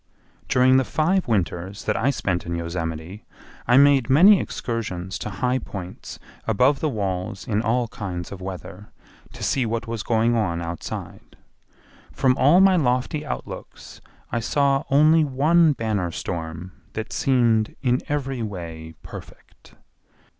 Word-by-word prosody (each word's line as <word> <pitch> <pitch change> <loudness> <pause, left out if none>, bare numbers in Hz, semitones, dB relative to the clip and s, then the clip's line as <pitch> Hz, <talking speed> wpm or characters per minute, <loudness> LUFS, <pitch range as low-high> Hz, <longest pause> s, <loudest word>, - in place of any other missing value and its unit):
During 130 +1 +4
the 130 - +3
five 175 +7 0
winters 95 -2 -2
that 105 - 0
I 115 +6 +1
spent 95 -10 -2
in 85 - -2
Yosemite 85 +3 -5 0.4
I 125 +1 +5
made 140 -3 +5
many 185 +9 +7
excursions 95 -6 -4
to - - -4
high 125 +7 -1
points 95 -5 -8 0.3
above 125 +6 +3
the 155 - 0
walls 100 -2 -3
in 105 -2 +1
all 120 +1 0
kinds 90 -6 -6
of 95 -2 -8
weather 95 +2 -8 0.4
to - - -9
see 135 - +1
what 115 0 -2
was 115 -2 -4
going 115 +2 +1
on 90 -7 0
outside; 85 0 -7 0.7
from 130 -1 +2
all 145 +8 +5
my 190 -1 +5
lofty 130 +2 0
outlooks - - -8 0.3
I 120 - 0
saw 140 +3 +1
only 155 +3 +5
one 150 +4 +3
banner 110 -8 -2
storm 85 +1 -5 0.2
that 110 0 -5
seemed 115 -5 +2
in 125 -1 +2
every 135 -3 -2
way 85 -6 -7
perfect. - - -13
115 Hz, 140 wpm, -23 LUFS, 95-135 Hz, 0.7 s, many